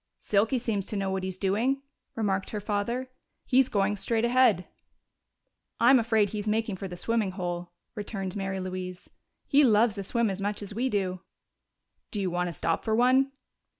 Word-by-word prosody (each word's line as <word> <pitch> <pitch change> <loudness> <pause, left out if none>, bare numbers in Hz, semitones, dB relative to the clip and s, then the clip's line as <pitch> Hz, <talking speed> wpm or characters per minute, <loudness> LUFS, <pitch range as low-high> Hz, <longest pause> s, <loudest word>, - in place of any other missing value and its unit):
"Silky 215 +5 +1
seems 220 -5 -2
to - - -4
know 195 -1 -1
what 190 0 -1
he's 185 0 -4
doing," 230 +9 0 0.3
remarked 195 -4 -1
her 210 - -3
father. 230 +5 -2 0.3
"He's 260 0 +4
going 205 0 +1
straight 225 +3 0
ahead." 240 -7 +4 1.1
"I'm 250 +2 +7
afraid 220 -3 +2
he's 210 0 -4
making 215 -2 0
for 195 - -5
the 180 - -7
swimming 220 -2 0
hole," 175 -1 -4 0.2
returned 200 -3 -4
Mary 195 -1 -2
Louise. 185 -1 -6 0.3
"He 290 0 +5
loves 220 -3 +4
a - - -3
swim 230 +2 0
as 195 +1 -5
much 205 +1 -2
as 205 - -5
we 250 +5 0
do." 185 -4 -1 0.9
"Do 210 - -3
you 190 -2 -1
want 180 0 0
to - - -3
stop - - -1
for 220 -1 +1
one?" 260 +3 +4
205 Hz, 180 wpm, -28 LUFS, 190-235 Hz, 1.1 s, I'm